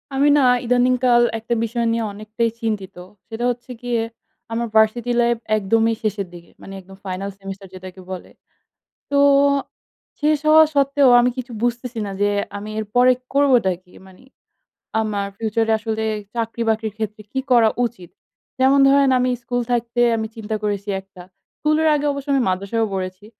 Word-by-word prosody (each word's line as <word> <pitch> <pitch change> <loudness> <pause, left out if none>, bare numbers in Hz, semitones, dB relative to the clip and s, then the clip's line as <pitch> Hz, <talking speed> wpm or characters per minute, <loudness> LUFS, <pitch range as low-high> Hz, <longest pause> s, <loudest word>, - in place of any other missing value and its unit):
আমি 285 +2 +4
না - - +4 0.2
ইদানিং 250 +1 +3
কাল 240 -1 +5 0.2
একটা 225 +2 -3
বিষয় 235 +1 -1
নিয়ে 230 0 -1
অনেকটাই 215 +3 -2
চিন্তিত। 205 -4 -3 0.3
সেটা 225 +1 -5
হচ্ছে 245 +1 -9
গিয়ে 240 -2 -1 0.5
আমার 235 +1 -2
ভার্সিটি 220 +2 +3
লাইফ 235 0 +2 0.2
একদমই 225 +3 +1
শেষের 205 -2 -2
দিকে। 170 -1 -13
মানে 195 - -10
একদম 190 +1 -15
ফাইনাল 190 +1 -4
সেমিস্টার 195 0 -8
যেটাকে 185 0 -10
বলে। 185 - -7 0.8
তো 280 - +3 1.0
শেষ 300 +1 +3
হওয়া 315 +1 +8
সত্ত্বেও 280 -1 +3
আমি 245 +1 +3
কিছু 255 0 -6
বুঝতেছি 240 0 -2
না। 200 - -5
যে, 205 - +3 0.3
আমি 205 +1 -7
এরপরে 245 +4 +3 0.2
করবটা 265 -8 +3
কি? 180 - -24
মানি 190 +5 -18 0.8
আমার 205 -2 -2
ফিউচার 225 +1 -1
এ - - +4
আসলে 220 0 -3 0.3
চাকরি-বাকরির 225 -2 -2
ক্ষেত্রে 215 -1 -4
কি 265 - -1
করা 235 -2 +6 0.2
উচিত? 205 -8 -6 0.5
যেমন 265 +2 +5
ধরেন 275 -1 +4
আমি 250 0 +1
স্কুল 245 +1 -2
থাকতে 240 0 -1 0.2
আমি 220 0 -2
চিন্তা 220 -1 -4
করেছি 205 -1 -2
একটা। 190 -2 -15 0.4
স্কুলের 305 +1 +2
আগে 295 0 -1
অবশ্য 280 0 -7
আমি 270 - +2
মাদ্রাসায়ও 200 +5 -1
পড়েছি। 185 +1 -5
225 Hz, 160 wpm, -21 LUFS, 205-245 Hz, 1.0 s, হওয়া